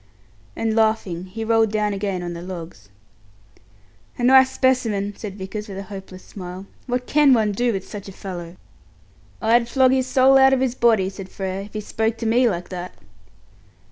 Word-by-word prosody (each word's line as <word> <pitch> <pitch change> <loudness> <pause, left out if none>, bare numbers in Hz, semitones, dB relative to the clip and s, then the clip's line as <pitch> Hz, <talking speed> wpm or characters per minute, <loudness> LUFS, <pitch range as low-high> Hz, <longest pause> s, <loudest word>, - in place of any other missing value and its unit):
And 225 -1 -1
laughing, 215 -6 +1
he 225 +4 -6
rolled 225 -1 +3
down 210 -1 0
again 195 -2 -3
on 175 0 -4
the 170 - -7
logs. 170 - -9 1.3
"A 245 - -4
nice 260 +1 +6
specimen!" 230 -7 0
said 200 -2 -8
Vickers, 210 +3 -6
with 195 -2 -8
a 195 - -5
hopeless 190 -2 -10
smile. 185 0 -9 0.2
"What 250 0 -2
can 290 -1 +4
one 215 -2 +1
do 240 +4 0
with 195 -3 -4
such 205 -2 -8
a - - -8
fellow?" 175 -3 -8 0.9
"I'd 235 +1 +3
flog 260 0 +4
his 260 -1 +1
soul 265 +1 +5
out 265 0 +6
of 265 - +2
his 260 -2 0
body," 225 -6 +3
said 190 -1 -9
Frere, 190 0 -4
"if 205 - -16
he 215 - -3
spoke 220 +2 -2
to 230 - -5
me 240 +2 +3
like 175 -3 -4
that!" 180 -1 -7
210 Hz, 185 wpm, -22 LUFS, 190-240 Hz, 1.3 s, nice